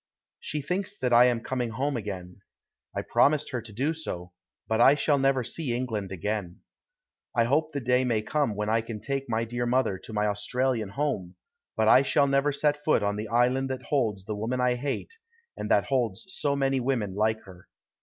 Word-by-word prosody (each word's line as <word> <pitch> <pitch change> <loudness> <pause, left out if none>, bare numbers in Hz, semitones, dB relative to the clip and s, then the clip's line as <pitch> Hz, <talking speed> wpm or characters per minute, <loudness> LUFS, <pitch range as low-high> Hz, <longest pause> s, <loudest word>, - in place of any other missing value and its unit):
She 150 -1 -3
thinks 185 +6 -2
that 125 -2 0
I 120 +1 +8
am 120 -2 +2
coming 125 -3 -2
home 135 +5 -1
again. 95 -4 -6 0.5
I - - -2
promised 150 0 +2
her 125 -3 -2
to 115 - -11
do 135 +9 0
so, 90 - -6 0.3
but 110 - +1
I 140 - +7
shall 145 -1 +2
never 135 -1 +2
see 125 0 -2
England 110 -6 -3
again. 95 -1 -3 0.7
I 120 - +4
hope 150 +6 +1
the 140 - -3
day 125 +1 +2
may 115 -4 0
come 145 -4 0
when 105 +1 -2
I 115 +1 +2
can 110 -1 -7
take 135 +1 -3
my 115 0 0
dear 120 +1 -2
mother 120 -6 +1
to - - -11
my 105 -1 0
Australian 110 +2 0
home, 100 -8 -2 0.4
but 110 0 +2
I 130 - +7
shall 140 +1 +3
never 140 +1 +2
set 145 +1 0
foot 150 -8 +3
on 100 0 0
the 105 +1 -4
island 125 +4 +2
that 130 -1 -4
holds 110 -9 0
the 105 - -3
woman 115 +5 -2
I 125 0 +3
hate, 140 - -4 0.4
and - - -5
that - - +4
holds 120 -8 -1
so 145 -6 0
many 135 -1 +1
women 120 -6 -1
like 110 +2 +1
her. 90 -2 -15
125 Hz, 205 wpm, -27 LUFS, 105-135 Hz, 0.7 s, I